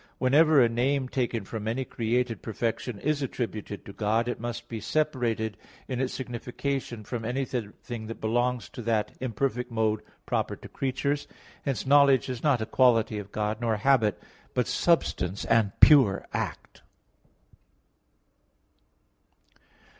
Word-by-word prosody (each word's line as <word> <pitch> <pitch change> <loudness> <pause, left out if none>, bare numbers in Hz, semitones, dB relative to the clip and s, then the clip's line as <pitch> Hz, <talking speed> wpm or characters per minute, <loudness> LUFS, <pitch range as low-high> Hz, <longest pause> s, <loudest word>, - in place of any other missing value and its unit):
2), - - -37
whenever 150 +3 +5
a 120 - +6
name 130 +3 0
taken 120 -5 -2
from 110 +1 -5
any 125 +4 -1
created 120 0 -1
perfection 115 +1 -3
is 150 0 0
attributed 110 -6 -4
to 100 - -9
God, 110 +3 +1
it 120 - -3
must 120 -2 -5
be 115 - -5
separated 115 -7 0 0.3
in 130 -1 -2
its 130 - -1
signification 125 -1 -4
from 115 +1 -5
anything 120 -2 -4
that 115 - -7
belongs 120 +1 0
to - - -8
that 110 -2 0
imperfect 125 0 -2
mode 110 -2 0 0.2
proper - - -1
to - - -12
creatures. 140 +2 -2 0.4
Hence 135 -2 -1
knowledge 140 -1 +5
is 125 -2 -4
not 135 -7 +2
a - - -3
quality 115 -3 +3
of 100 0 -9
God, 105 +1 -2
nor 115 -2 +1
a 105 - -8
habit; 120 -7 +4 0.4
but 125 - +2
substance 100 - +1
and 115 -3 +3
pure 130 -10 +7
act. - - -4
120 Hz, 140 wpm, -27 LUFS, 110-130 Hz, 0.4 s, pure